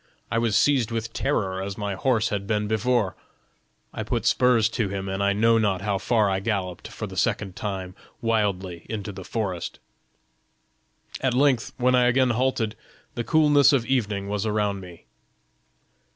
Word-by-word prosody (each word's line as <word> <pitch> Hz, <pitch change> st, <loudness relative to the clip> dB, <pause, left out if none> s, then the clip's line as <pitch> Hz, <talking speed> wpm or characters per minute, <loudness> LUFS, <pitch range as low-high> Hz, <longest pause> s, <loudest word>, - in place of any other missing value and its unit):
I 115 Hz, -, +2 dB
was 115 Hz, -3 st, +1 dB
seized 135 Hz, -6 st, +3 dB
with 115 Hz, -1 st, -4 dB
terror 95 Hz, -9 st, -1 dB
as 100 Hz, 0 st, -5 dB
my 100 Hz, -2 st, -2 dB
horse 115 Hz, +2 st, +1 dB
had 100 Hz, -3 st, -3 dB
been 105 Hz, 0 st, 0 dB
before: 110 Hz, -2 st, +1 dB, 0.8 s
I -, -, -4 dB
put 115 Hz, 0 st, -2 dB
spurs 120 Hz, -2 st, +4 dB
to 110 Hz, -3 st, -1 dB
him, 95 Hz, 0 st, -4 dB
and 95 Hz, +1 st, -2 dB
I 100 Hz, 0 st, +3 dB
know 115 Hz, +3 st, +3 dB
not 100 Hz, -4 st, +1 dB
how 100 Hz, -2 st, 0 dB
far 110 Hz, 0 st, +2 dB
I 95 Hz, -1 st, 0 dB
galloped 95 Hz, -4 st, -3 dB
for -, -, -6 dB
the -, -, -9 dB
second 95 Hz, -3 st, -1 dB
time 95 Hz, -3 st, -4 dB, 0.3 s
wildly 100 Hz, -6 st, -1 dB
into 105 Hz, -2 st, -4 dB
the 95 Hz, -1 st, -9 dB
forest." 95 Hz, -5 st, -3 dB, 1.4 s
"At 130 Hz, -2 st, +1 dB
length, 130 Hz, -3 st, +2 dB
when 125 Hz, 0 st, +2 dB
I 125 Hz, -1 st, +4 dB
again 125 Hz, 0 st, +3 dB
halted, 120 Hz, -2 st, 0 dB, 0.4 s
the 120 Hz, -, -3 dB
coolness 145 Hz, -1 st, +5 dB
of 125 Hz, -4 st, +2 dB
evening 105 Hz, -7 st, -1 dB
was 100 Hz, 0 st, -2 dB
around 105 Hz, -2 st, 0 dB
me. 90 Hz, -3 st, -12 dB
110 Hz, 165 wpm, -25 LUFS, 100-120 Hz, 1.4 s, coolness